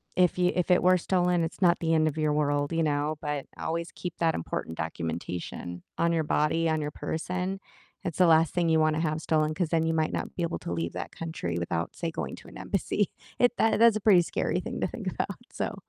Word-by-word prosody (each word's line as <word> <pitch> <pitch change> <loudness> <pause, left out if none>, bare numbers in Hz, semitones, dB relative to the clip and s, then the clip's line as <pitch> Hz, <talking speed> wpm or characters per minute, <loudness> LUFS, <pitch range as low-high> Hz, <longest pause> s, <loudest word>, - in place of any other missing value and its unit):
if 180 -1 +3
you 180 0 +4
if 180 0 +1
it 180 - +5
were 185 0 +6
stolen, 180 -1 +1
it's 165 +4 -5
not 175 -1 +5
the 165 -1 +1
end 155 0 +4
of 155 +1 -2
your 155 -1 +1
world, 145 +1 +1
you 165 - +1
know, 150 0 0
but 150 -2 -3
always 165 +1 -3
keep 175 -2 -6
that 165 -1 +3
important 80 0 -4
documentation 85 +2 -4
on 170 0 +2
your 160 -1 +1
body, 155 +2 +1
on 155 -1 +1
your 145 - -2
person, 180 +5 -3 0.4
it's 170 - -4
the 180 - +7
last 160 -1 +5
thing 175 -2 +1
you 160 0 +4
wanna 155 0 +2
have 155 -1 -1
stolen, 155 -1 +1
'cause 175 -2 -1
then 165 -1 +2
you 165 - +1
might 160 -1 +1
not - - -3
be 175 - -3
able 170 - -1
to 85 - -4
leave 85 0 -2
that - - -5
country 160 - -4
without, 85 -1 -2
say, 170 - -2
going - - -4
to - - -15
an - - -11
embassy, - - -1 0.3
it 245 0 +4
that 225 - +3
that's 230 -2 +7
a - - -6
pretty 190 -5 +6
scary 155 - -1
thing - - -5
to - - +2
think - - -8
about, - - -2
so, - - -3
160 Hz, 240 wpm, -28 LUFS, 150-175 Hz, 0.4 s, the